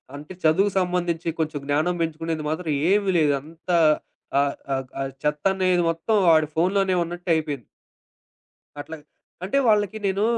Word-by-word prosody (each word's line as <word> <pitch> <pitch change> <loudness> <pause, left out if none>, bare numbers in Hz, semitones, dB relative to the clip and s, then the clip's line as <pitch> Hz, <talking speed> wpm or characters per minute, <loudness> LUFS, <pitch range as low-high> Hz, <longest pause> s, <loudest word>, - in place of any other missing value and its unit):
అంటే 150 +5 -9
చదువు 185 +6 +4
సంబంధించి 175 -2 -1
కొంచెం 155 -2 -1
జ్ఞానం 155 +5 +1
పెంచుకునేది 165 -1 -2
మాత్రం 160 0 -2 0.2
ఏమి 200 -2 +2
లేదు. 150 -3 +3
అంత 165 +4 -16 0.7
ఆహ్, 140 0 +1 0.2
ఆహ్, 135 -1 -2
ఆ - - -1 0.2
చెత్తనేది 180 +4 +1
మొత్తం 165 +7 0
వాడి 155 -2 +5
ఫోనులోనే 185 +3 +1
ఉన్నట్టయిపోయింది. 160 - -2 1.2
అట్లాగ. 160 +1 -8 0.4
అంటే, 240 +9 +1
వాళ్ళకి 210 0 +2
నేను 195 +2 +1
165 Hz, 125 wpm, -24 LUFS, 155-185 Hz, 1.2 s, వాడి